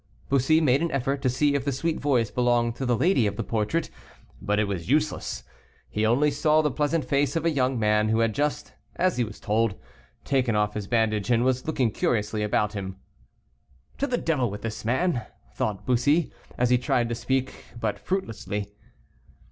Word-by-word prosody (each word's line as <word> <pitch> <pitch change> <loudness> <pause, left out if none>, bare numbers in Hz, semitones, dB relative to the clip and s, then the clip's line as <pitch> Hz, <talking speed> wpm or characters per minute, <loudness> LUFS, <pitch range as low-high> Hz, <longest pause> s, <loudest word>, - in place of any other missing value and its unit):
Bussy 140 +4 +3
made 140 -1 +3
an 170 - 0
effort 135 0 -1
to 130 - +2
see 140 +3 +2
if 140 -2 0
the 140 - -1
sweet 155 +5 -1
voice 125 -7 +1
belonged 120 -1 +1
to 135 - -3
the 120 -2 +2
lady 135 - +3
of 100 - -3
the 115 - -3
portrait, 115 +10 -1 0.5
but 105 +1 0
it 105 - +3
was 100 -4 -4
useless. 150 +2 0 0.5
He 110 +1 +1
only 140 +6 +3
saw 155 +1 +3
the 150 - +1
pleasant 150 +1 0
face 140 +1 +1
of 165 0 -1
a 165 - +3
young 130 -3 +1
man, 105 -1 +2
who 110 +1 +2
had 115 -1 +1
just, 145 +3 -2 0.2
as 180 -2 +1
he 125 - +2
was 110 -2 -7
told, 110 -1 +1 0.5
taken 130 -5 +1
off 105 0 +1
his 105 -2 -5
bandage, 110 -2 +1
and 120 -1 +3
was 130 +1 0
looking 130 -7 +1
curiously 105 0 0
about 105 0 0
him. 95 -2 -5 1.0
"To 280 - +1
the 245 - 0
devil 140 - 0
with 105 +1 -7
this 110 -1 -5
man," 130 +4 0 0.3
thought 105 -7 -3
Bussy, 140 +6 +2 0.2
and 125 - +2
he 125 0 +3
tried 120 -1 +1
to - - -1
speak, 130 +2 -2 0.2
but 110 -3 -2
fruitlessly. 105 - -3
125 Hz, 195 wpm, -26 LUFS, 110-145 Hz, 1.0 s, Bussy